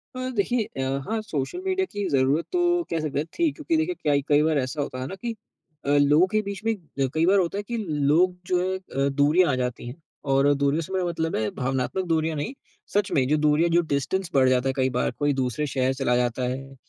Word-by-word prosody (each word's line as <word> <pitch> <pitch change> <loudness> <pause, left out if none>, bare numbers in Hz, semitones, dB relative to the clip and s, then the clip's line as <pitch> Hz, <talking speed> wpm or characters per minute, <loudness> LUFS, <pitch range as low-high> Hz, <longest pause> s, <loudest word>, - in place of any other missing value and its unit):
अ, 255 0 -3
देखिए 230 +3 +1 0.2
अ, 135 +1 -1
हाँ 220 0 -1
social 160 - -4
media 380 0 +1
की 205 -1 -2
ज़रूरत 135 +4 +2
तो 355 - +2 0.3
कह 165 - -1
सकते 150 -2 -2
हैं 150 - -1
थी 335 -3 +3
क्योंकि 320 +3 -2
देखिए 330 +3 0
क्या 150 - 0
कई 145 0 +5
बार 155 -1 +2
ऐसा 130 +3 -2
होता 130 -2 -4
है 130 - -3
ना 190 - -6
कि 230 +4 -5 0.5
अ, - - -1
लोगों 145 +5 +5
के 215 - +3
बीच 200 0 -5
में 225 - +2
अ, 150 -7 -3
कई 160 +1 +2
बार 195 +3 +4
होता 180 +1 -1
है 205 - -3
कि 235 - -3 0.3
लोग 180 +3 +3
जो 180 -1 +2
है 185 +1 -1
अ, 140 -7 -2
दूरियाँ 155 +3 +4
आ - - +1
जाती 125 -1 -3
हैं। 135 +7 -9 0.3
और 135 +1 +4
दूरियों 140 +3 +1
से 165 - -7
मेरा 185 -1 0
मतलब 165 -2 -2
है 110 -1 0
भावनात्मक 135 +8 -2
दूरियाँ 160 -1 0
नहीं, 145 - -3 0.4
सच 205 -1 +1
में 130 -2 +2
जो 150 +3 +2
दूरियाँ 150 +3 +3
जो 175 - +5
डिस्टेंस 165 +7 -1
बढ़ 130 -2 +4
जाता 130 +1 +2
है - - 0
कई 130 0 +2
बार। - - +1
कोई 145 -1 +2
दूसरे 130 +2 -1
शहर 130 -1 0
चला 135 -2 0
जाता 125 +1 0
है, 135 +1 -6
150 Hz, 240 wpm, -25 LUFS, 135-190 Hz, 0.5 s, कई